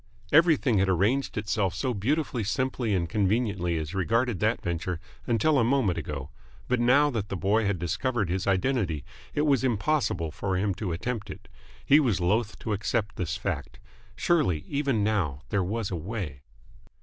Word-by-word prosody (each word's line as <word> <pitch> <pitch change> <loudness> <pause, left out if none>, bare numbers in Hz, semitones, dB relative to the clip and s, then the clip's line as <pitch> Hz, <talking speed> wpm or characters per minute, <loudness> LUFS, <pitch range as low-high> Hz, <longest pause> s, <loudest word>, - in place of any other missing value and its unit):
Everything 150 - +4
had 95 0 +2
arranged 105 +11 +1
itself 100 -3 0
so 125 +6 -1
beautifully 125 +3 -1
simply 120 -1 0
and 85 -2 0
conveniently 100 -2 0
as 80 +2 -4
regarded 115 +3 +1
that - - +1
venture 85 0 -3 0.3
until 130 +5 +3
a - - +4
moment 115 -7 +2
ago; 70 -1 -5 0.4
but 125 0 +1
now 140 +5 +4
that 110 -5 -3
the 95 - -3
boy 105 +3 +2
had 100 -2 0
discovered 95 - -1
his 95 +3 -2
identity 95 - 0 0.3
it 145 - +2
was 140 -4 +3
impossible 115 - 0
for 95 +3 -2
him 100 +1 +1
to 90 0 -4
attempt 105 +5 -3
it. - - -9 0.4
He 145 - +6
was 120 -11 +1
loth 105 +5 0
to 110 - -2
accept 105 +1 -1
this 85 -2 -2
fact. - - -4 0.4
Surely, 125 - +1
even 140 -7 0
now, 90 -10 0
there 100 -3 +1
was 105 +3 -2
a - - -1
way 85 - -5
105 Hz, 170 wpm, -27 LUFS, 90-125 Hz, 0.4 s, He